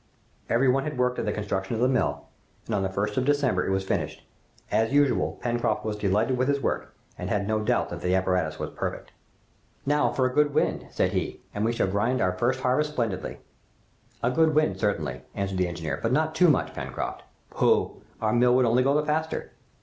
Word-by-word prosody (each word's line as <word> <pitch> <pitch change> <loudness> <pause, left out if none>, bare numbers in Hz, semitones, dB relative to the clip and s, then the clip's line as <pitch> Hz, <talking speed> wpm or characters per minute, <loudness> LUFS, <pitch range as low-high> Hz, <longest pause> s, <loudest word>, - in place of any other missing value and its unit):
Every 125 +3 +3
one 135 +2 +3
had 150 -2 -4
worked 125 0 +1
at - - -2
the 105 - 0
construction 100 0 -2
of 110 - -2
the 125 - +4
mill, 70 - 0 0.4
and 115 - -4
on 100 - +1
the 95 - 0
1st 105 +2 -2
of 130 - +2
December 140 -10 +2
it - - 0
was 95 0 0
finished. 95 - -3 0.5
As 110 +2 +2
usual, 145 -1 +2
Pencroft 120 -2 0
was 110 -1 -1
delighted 105 +5 +1
with 130 - +2
his 140 0 +2
work, - - -2 0.2
and - - -4
had 100 -1 0
no 110 0 +1
doubt 120 +3 +1
that - - -6
the 90 +1 +1
apparatus 90 -4 0
was - - -4
perfect. - - -5 0.7
"Now 145 -4 +2
for 130 +1 +1
a 130 - 0
good 145 0 +2
wind," - - 0
said - - 0
he, - - -2
"and 105 - -2
we 115 - +2
shall 120 - +1
grind 105 +7 0
our 90 0 +1
first 125 +7 0
harvest 150 +4 +1
splendidly!" 110 -9 -3 0.8
"A 120 - +2
good 160 +2 +3
wind, 155 0 +2
certainly," 75 - -1
answered 95 -1 -2
the 90 - +2
engineer, 85 -2 -4
"but 115 - 0
not 155 +3 +1
too 175 +3 +5
much, 145 - +1
Pencroft." - - -5 0.3
"Pooh! - - +1 0.2
our 110 -1 0
mill 125 +1 +4
would 130 -1 +4
only 120 +2 +3
go 140 +3 +3
the 150 - -2
faster!" 155 +1 -2
120 Hz, 215 wpm, -26 LUFS, 100-135 Hz, 0.8 s, too